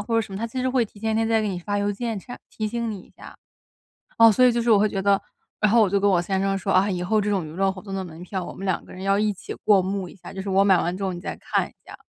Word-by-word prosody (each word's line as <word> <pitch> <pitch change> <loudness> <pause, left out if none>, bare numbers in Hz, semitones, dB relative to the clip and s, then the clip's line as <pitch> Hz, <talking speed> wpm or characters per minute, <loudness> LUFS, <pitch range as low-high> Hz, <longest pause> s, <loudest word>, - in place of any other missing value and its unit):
或 230 +3 -3
者 225 - +4
什 200 - -10
么， 195 - -4
它 230 - -2
其 255 +3 -6
实 255 - 0
会 255 -2 +2
提 210 - -15
前 220 +1 -1
一 - - 0
天 225 0 +1
再 225 -1 +2
给 210 - -1
你 180 -2 -3
发 205 +3 -3
邮 205 0 0
件 225 0 -3
Che 245 +6 -9
提 215 - -3
醒 230 +1 -2
你 200 - -6
一 - - -18
下。 - - -13 0.8
哦， 230 -1 +8
所 255 - +2
以 250 - +7
就 235 0 0
是 235 - +1
我 210 - +7
会 210 +1 +3
觉 195 -1 -3
得 200 0 +3 0.4
然 215 -1 +3
后 230 0 +5
我 195 - +2
就 200 - +2
跟 200 0 +3
我 175 -2 +3
先 190 +1 -1
生 195 0 +1
说： 195 +1 -1
“啊！ 195 +2 +3
以 180 -1 -2
后 215 +4 +2
这 210 - -2
种 195 -4 0
娱 - - -9
乐 195 +2 +1
活 185 -1 -8
动 195 -2 -7
的 190 - -2
门 165 0 -10
票 185 0 -4
我 - - -8
们 195 - -8
两 190 -2 0
个 - - -14
人 185 - -9
要 195 +1 +2
一 210 0 +1
起 - - -8
过 200 -3 +5
目 190 -1 -3
一 - - -14
下， 180 - -11
就 190 - -6
是 195 - -5
我 195 +1 +4
买 190 -3 +5
完 175 +2 -1
之 200 - -7
后 190 - -1
你 175 - -7
再 - - -5
看 - - -1
一 - - -24
下。” - - -12
200 Hz, 395 characters per minute, -24 LUFS, 190-220 Hz, 0.8 s, 哦